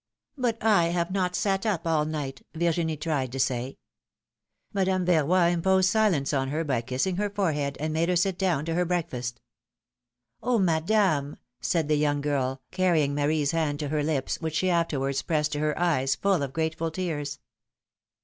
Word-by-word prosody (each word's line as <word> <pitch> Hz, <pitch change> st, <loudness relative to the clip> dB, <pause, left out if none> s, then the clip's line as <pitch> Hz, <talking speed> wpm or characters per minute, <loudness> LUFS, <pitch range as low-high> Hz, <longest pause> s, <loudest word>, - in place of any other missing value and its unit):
But 245 Hz, -5 st, 0 dB
I 205 Hz, -6 st, +4 dB
have 170 Hz, +1 st, -1 dB
not 180 Hz, -2 st, 0 dB
sat 195 Hz, 0 st, 0 dB
up 205 Hz, -8 st, -1 dB
all 160 Hz, -2 st, +2 dB
night, 145 Hz, -4 st, -4 dB
Virginie 165 Hz, -1 st, 0 dB
tried 145 Hz, -5 st, -2 dB
to 135 Hz, -, -4 dB
say. 130 Hz, 0 st, -1 dB, 1.0 s
Madame 190 Hz, -2 st, +1 dB
Yerroy 175 Hz, +1 st, +3 dB
imposed 190 Hz, +2 st, +3 dB
silence 185 Hz, -11 st, +2 dB
on 135 Hz, -1 st, +1 dB
her 155 Hz, +4 st, -1 dB
by 135 Hz, -6 st, 0 dB
kissing 130 Hz, +10 st, -1 dB
her 205 Hz, +1 st, 0 dB
forehead, 150 Hz, -9 st, -1 dB
and 155 Hz, +1 st, -2 dB
made 165 Hz, +2 st, +1 dB
her 180 Hz, -, +2 dB
sit 180 Hz, +1 st, +1 dB
down 175 Hz, -7 st, +1 dB
to 165 Hz, -, -2 dB
her 175 Hz, +2 st, +2 dB
breakfast. 155 Hz, -9 st, -3 dB, 1.0 s
^^Oh, 245 Hz, -2 st, +1 dB
Madame! 165 Hz, -4 st, +1 dB, 0.2 s
said 165 Hz, -4 st, 0 dB
the 150 Hz, -1 st, +2 dB
young 145 Hz, -1 st, +1 dB
girl, 135 Hz, -2 st, -1 dB
carrying 170 Hz, -6 st, +2 dB
Marie's 145 Hz, 0 st, +1 dB
hand 155 Hz, -3 st, 0 dB
to 145 Hz, -1 st, -4 dB
her 150 Hz, 0 st, 0 dB
lips, 145 Hz, 0 st, -1 dB
which 160 Hz, -1 st, -3 dB
she 185 Hz, +3 st, +2 dB
afterwards 140 Hz, -5 st, 0 dB
pressed 150 Hz, -2 st, 0 dB
to 145 Hz, -, -2 dB
her 150 Hz, 0 st, 0 dB
eyes, 135 Hz, -6 st, +1 dB
full 195 Hz, -5 st, +1 dB
of 140 Hz, -2 st, -3 dB
grateful 160 Hz, +2 st, -1 dB
tears. 155 Hz, -4 st, -3 dB
160 Hz, 175 wpm, -27 LUFS, 145-180 Hz, 1.0 s, I